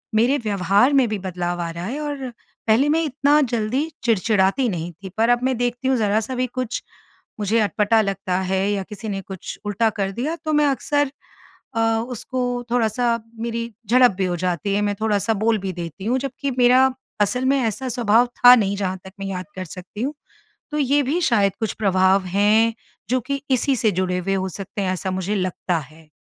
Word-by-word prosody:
मेरे 245 +6 +3
व्यवहार 200 - +3
में 265 -3 +4
भी 215 - -1
बदलाव 175 -2 -3
आ 170 - -3
रहा 170 +2 -6
है 265 +8 -4
और 285 -4 -4 0.4
पहले 245 +7 +4
मैं 320 +2 +3
इतना 290 +1 +2
जल्दी 245 +4 -1
चिड़चिड़ाती 220 +2 +2
नहीं 175 -2 -4
थी, 190 +4 -10
पर 225 +2 +3
अब 245 +1 +3
मैं 260 -1 +1
देखती 245 +2 -1
हूँ 265 -1 +3
ज़रा-सा 220 +4 0
भी 255 0 0
कुछ 250 -1 -4 0.6
मुझे 215 +2 +1
अटपटा 215 +1 +2
लगता 195 -2 -1
है 190 +1 0
या 200 -2 -1
किसी 215 +1 -6
ने 195 -1 -3
कुछ 190 -1 -8
उल्टा 210 +2 +1
कर 195 0 0
दिया 275 - -2
तो 310 - 0
मैं 300 0 +4
अक्सर 285 +1 0 0.6
अ, 225 - 0 0.3
उसको 245 0 -3
थोड़ा-सा 235 0 +1 0.2
मेरी 230 0 -3 0.2
झड़प 250 0 +6
भी 190 - +1
हो 180 -1 -1
जाती 180 +2 -1
है, 205 - +1
मैं 205 0 0
थोड़ा-सा 220 0 +1
बोल 220 +2 +1
भी 190 -1 -4
देती 170 +3 -7
हूँ, 250 +3 +1
जबकि 275 +1 -3
मेरा 255 +2 +5 0.3
असल 250 +5 +1
में 275 +1 +3
ऐसा 235 +3 -2
स्वभाव 235 -1 +3 0.2
था 245 - +12
नहीं 200 -3 +1
जहाँ 190 -2 -2
तक 190 - -9
मैं 195 - -4
याद 185 -1 -4
कर 185 - -5
सकती 185 +4 -9
हूँ। 285 - -2 0.6
तो 300 - -2
ये 285 +1 +3
भी 295 +7 0
शायद 205 - +3
कुछ 220 - -1
प्रभाव 190 -1 +2
हैं 210 +4 +3 0.4
जो 255 - +2
कि 275 -1 -2
इसी 265 +2 +2
से 220 -3 +2
जुड़े 180 0 -1
हुए 195 +2 -1
हो 190 0 -1
सकते 195 +3 -6
हैं, 185 -1 0
ऐसा 185 +1 -3
मुझे 190 +3 -2
लगता 185 -2 -1
है। 155 +2 -15
220 Hz, 200 wpm, -22 LUFS, 190-250 Hz, 0.6 s, था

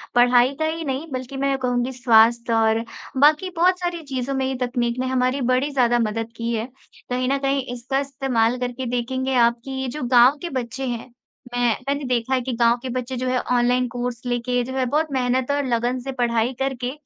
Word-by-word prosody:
पढ़ाई 245 +2 +5
का 315 - +1
ही 325 +1 -2
नहीं, 275 +3 -3
बल्कि 255 +1 -5
मैं 275 +1 0
ये 270 - 0
कहूँगी 250 -1 -1
स्वास्थ्य 235 -1 +4
और 225 0 +2 0.3
बाकी 300 +6 +4
बहुत 360 +2 +3
सारी 350 -1 -3
चीज़ों 270 -2 -3
में 265 0 0
ये 265 0 -2
तकनीक 240 -1 -1
ने 260 - -1
हमारी 255 +1 0
बड़ी 260 +3 +1
ज़्यादा 240 -3 +2
मदद 225 0 -2
की 230 0 -2
है। 225 0 -1 0.4
कहीं 255 +1 0
न 275 - +2
कहीं 275 0 0
इसका 250 +3 -2
इस्तेमाल 255 -4 0
करके 250 +1 -3
देखेंगे 260 +2 -1
आप 235 -1 +3
कि 270 - -6
ये 265 - -2
जो 285 +3 -5
गाँव 245 +3 +5
के 345 - -4
बच्चे 260 -1 -4
हैं, 240 0 -5 0.4
मैं 245 0 +2 0.2
मैंने 285 +1 -1
देखा 255 +1 0
कि 255 0 -4
गाँव 235 0 +3
के 260 - -5
बच्चे 255 +1 -3
जो 255 +1 -2
हैं 255 0 +1
ऑनलाइन 250 +1 +2
कोर्स 245 0 -4
लेके 245 0 0
जो 260 +2 -6
है 265 -1 0
बहुत 300 +5 +1
मेहनत 255 0 0
और 285 0 0
लगन 245 +1 0
से 270 +2 -5
पढ़ाई 240 -1 0
करके, 260 -2 -2
255 Hz, 210 wpm, -22 LUFS, 240-270 Hz, 0.4 s, पढ़ाई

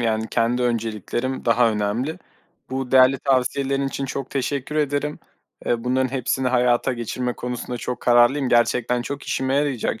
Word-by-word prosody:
yani, 110 -1 0
kendi 120 +1 +1
önceliklerim 120 +2 -2
daha 115 -1 +4
önemli. 110 +8 -2 0.5
Bu 130 -1 -3
değerli 130 0 +6
tavsiyelerin 135 +1 0
için 135 0 -4
çok 135 0 -5
teşekkür 140 +2 -2
ederim. 150 0 -1 0.5
Iıı, 120 0 0
bunların 130 +1 +1
hepsini 130 0 0
hayata 125 0 +2
geçirme 125 +1 -3
konusunda 125 0 -5
çok 125 +1 -5
kararlıyım. 125 +3 +4
Gerçekten 120 +1 +2
çok 140 +2 -5
işime 130 0 -1
yarayacak 140 -6 0
125 Hz, 145 wpm, -22 LUFS, 120-135 Hz, 0.5 s, değerli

